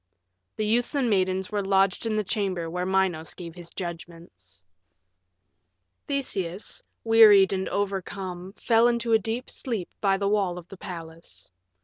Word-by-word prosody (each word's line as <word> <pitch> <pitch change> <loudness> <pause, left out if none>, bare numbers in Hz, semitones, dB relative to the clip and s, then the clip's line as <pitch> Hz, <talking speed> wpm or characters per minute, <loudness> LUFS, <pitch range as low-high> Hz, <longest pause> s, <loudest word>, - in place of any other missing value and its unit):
The 215 - -1
youths 240 +6 +1
and 255 -5 +1
maidens 185 -1 0
were 205 -1 0
lodged 195 +2 +2
in 220 - 0
the 215 - +1
chamber 190 -4 -2
where 180 +1 -2
Minos 185 -5 0
gave 170 -2 -8
his 175 -1 -10
judgments. 165 - -9 1.4
VI 280 - -1
Theseus, 185 -3 -4 0.2
wearied 215 -4 +7
and 190 0 -2
overcome, 190 -2 -4
fell 230 +2 +3
into 235 -1 +1
a 220 - +6
deep 225 +4 -3
sleep 225 -9 -3
by 195 -2 +3
the 200 0 -1
wall 200 -4 +1
of 175 -1 -10
the 195 - -10
palace. 165 - -9
190 Hz, 150 wpm, -26 LUFS, 175-215 Hz, 1.4 s, wearied